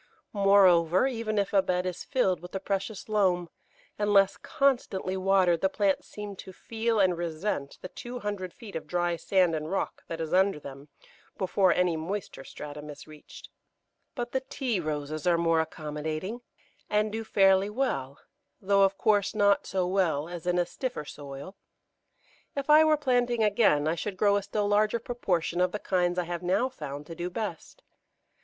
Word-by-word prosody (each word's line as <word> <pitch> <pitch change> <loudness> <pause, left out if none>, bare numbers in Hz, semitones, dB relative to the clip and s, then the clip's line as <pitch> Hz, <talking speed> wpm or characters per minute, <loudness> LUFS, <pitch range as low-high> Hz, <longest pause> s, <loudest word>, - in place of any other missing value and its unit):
Moreover, 190 -2 +5
even 230 -5 -2
if 200 0 0
a 195 - +5
bed 180 -1 -1
is 180 -1 -4
filled 190 - +1
with 180 +2 -11
the 195 - -2
precious 195 +2 -3
loam, 185 -5 +1 0.5
unless 200 -2 +4
constantly 245 -10 0
watered 185 -3 +3
the 190 - +3
plants 195 -1 0
seem 210 -1 -7
to 190 - -9
feel 225 +3 -2
and 185 -3 +3
resent 165 -3 -3
the - - -4
two 245 +6 -8
hundred 205 -5 -4
feet 225 -3 -12
of 160 -1 -5
dry 175 +1 0
sand 180 0 +2
and 155 0 -3
rock 195 - -2
that 165 - -5
is 160 -1 -3
under 190 -3 +3
them 140 0 -10 0.5
before 190 0 +2
any 180 -2 +2
moister 170 -2 -5
stratum 150 +2 -9
is 145 -1 -10
reached. 155 -1 -13 0.7
But 240 -2 -4
the 265 - +1
Tea 260 -5 -2
Roses 155 -1 -3
are 170 -1 +4
more 165 -1 +2
accommodating, 155 +7 -4 0.5
and 210 0 +1
do 225 +1 -3
fairly 195 -2 +4
well, 175 - -2 0.4
though, 200 +1 +2
of 195 0 +3
course, 210 -1 +2
not 200 -1 +3
so 185 -1 0
well 180 -5 0
as 175 -1 -7
in 180 0 +2
a 175 - +2
stiffer 180 - -5
soil. 145 +6 -9 1.0
If 280 +1 0
I 305 +1 +8
were 310 -1 +4
planting 245 -4 +1
again 200 -8 +3
I 160 - +2
should 185 +3 -4
grow 200 +1 +3
a 205 - +1
still 205 +1 -2
larger 210 +2 +2
proportion 190 -8 -1
of 180 0 +2
the 210 - -2
kinds 180 -3 0
I 180 - +1
have 175 0 -5
now 185 +8 +1
found 150 - -7
to 165 - -8
do 175 +2 -4
best. 190 -3 -6
190 Hz, 175 wpm, -28 LUFS, 170-210 Hz, 1.0 s, I